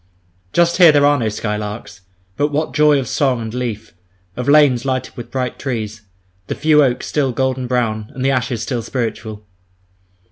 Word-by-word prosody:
Just 170 0 +2
here 175 -4 +8
there 145 -1 +4
are 145 0 +3
no 110 -2 0
skylarks, 105 -1 -5 0.3
but 145 - +1
what 150 -1 -2
joy 150 0 +4
of 135 - -2
song 135 -5 +1
and 110 -1 -6
leaf; 115 -5 -4 0.4
of 125 +2 -3
lanes 140 -5 +5
lighted 130 -1 -3
with 120 -3 -8
bright 130 -2 -3
trees, 110 -5 -4 0.5
the - - -3
few 150 -1 +4
oaks 125 -3 0
still 140 -3 0
golden 130 +1 -1
brown, 110 -4 -1
and 130 0 -3
the 135 - +3
ashes 125 -3 -1
still 125 -3 -2
spiritual! 110 -3 -4
125 Hz, 175 wpm, -18 LUFS, 115-145 Hz, 0.5 s, here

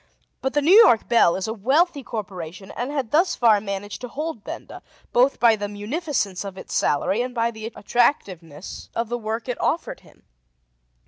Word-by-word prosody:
But 265 - -1
the 290 - +1
New 335 +6 +5
York 410 - +7
Bell 235 -8 +4
is 190 - -3
a 220 - -2
wealthy 280 - +1
corporation 190 -6 -7
and 245 +3 -4
had 275 -6 -3
thus 345 +5 +3
far 220 -4 +4
managed 200 +1 -5
to 250 - -5
hold 295 -3 -5
Benda, - - -8 0.3
both 255 +3 +3
by 230 -2 +5
the 205 -1 -4
munificence 210 - -3
of 195 -1 -8
its - - -9
salary 190 +10 +1
and 250 0 -4
by 230 0 +1
the 220 -1 -7
attractiveness 185 - -1
of 230 -1 -2
the 240 - -1
work 225 +2 -4
it 250 - -3
offered - - -1
him. - - -22
230 Hz, 185 wpm, -23 LUFS, 200-265 Hz, 0.3 s, York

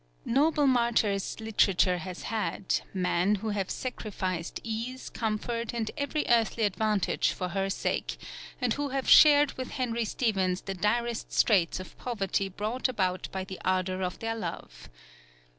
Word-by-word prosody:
Noble 295 +4 +3
martyrs 235 -7 +1
Literature 195 -4 +2
has 185 0 -7
had, 215 -3 -1
men 180 +1 +1
who 215 +2 -4
have 200 -3 -2
sacrificed 185 -8 -4
ease, 230 +3 -5
comfort, 230 +1 -2
and 225 -2 -2
every 290 +1 -1
earthly 230 -1 +2
advantage 210 -2 +1
for 180 -1 -3
her 195 +1 -1
sake, 195 - -2 0.4
and 250 -4 +1
who 285 0 -2
have 270 0 -2
shared 295 -2 +8
with 255 - -4
Henry 235 -3 -1
Stephens 195 -5 0
the 195 - -4
direst 230 +5 -1
straits 185 -6 +3
of 185 - -10
poverty 200 -4 -1
brought 215 +7 -2
about 185 -6 -1
by 190 -1 -3
the 190 0 -8
ardour 185 0 0
of 180 -1 -2
their 225 0 -3
love. - - -7
215 Hz, 145 wpm, -29 LUFS, 190-235 Hz, 0.4 s, shared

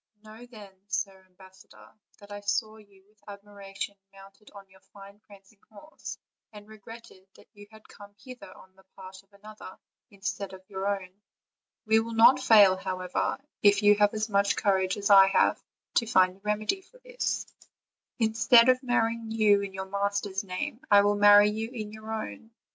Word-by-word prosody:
Know, 220 +3 -14
then, 210 -5 -14 0.2
Sir 195 -1 -4
Ambassador, 185 - -19 0.2
that 205 0 -17
I 205 - -7
saw 215 +2 -3
you 200 -3 -22
with 210 0 -34
admiration 200 -1 -9 0.2
mounted 195 +2 -18
on 200 -1 -13
your 190 0 -23
fine 200 +1 -17
prancing 200 +1 -20
horse, 260 +10 -11 0.3
and 210 -1 -14
regretted 215 -2 -15
that - - -19
you 205 -1 -15
had 220 -1 -18
come 205 0 -16
hither 250 -4 -13
on 190 0 -19
the 190 - -23
part 190 0 -12
of 195 - -39
another 210 -1 -13 0.3
instead 200 0 -6
of 190 0 -14
your 190 0 -5
own: 195 -1 -5 0.6
we 220 0 +3
will 230 0 -5
not 240 +4 +6
fail, 210 -7 +5
however, 185 -1 -3 0.2
if 205 0 +3
you 205 0 +6
have 205 0 +1
as 215 0 -2
much 200 -1 +1
courage 190 -1 0
as 205 0 -2
I 195 -1 +8
have, 195 - +1 0.4
to 230 - +1
find 185 -5 +2
a - - -24
remedy 210 - -2
for - - -23
this; - - -4 0.7
instead 230 +2 +4
of 255 0 +3
marrying 230 -3 -1
you 215 -2 +2
in 200 -1 -6
your 190 0 -7
master's 200 0 -3
name, 190 +5 -6
I 200 0 +6
will 205 0 +2
marry 205 0 +6
you 220 +1 -5
in 220 -4 -8
your 220 0 -10
own. 220 - -7
205 Hz, 175 wpm, -27 LUFS, 195-220 Hz, 0.7 s, I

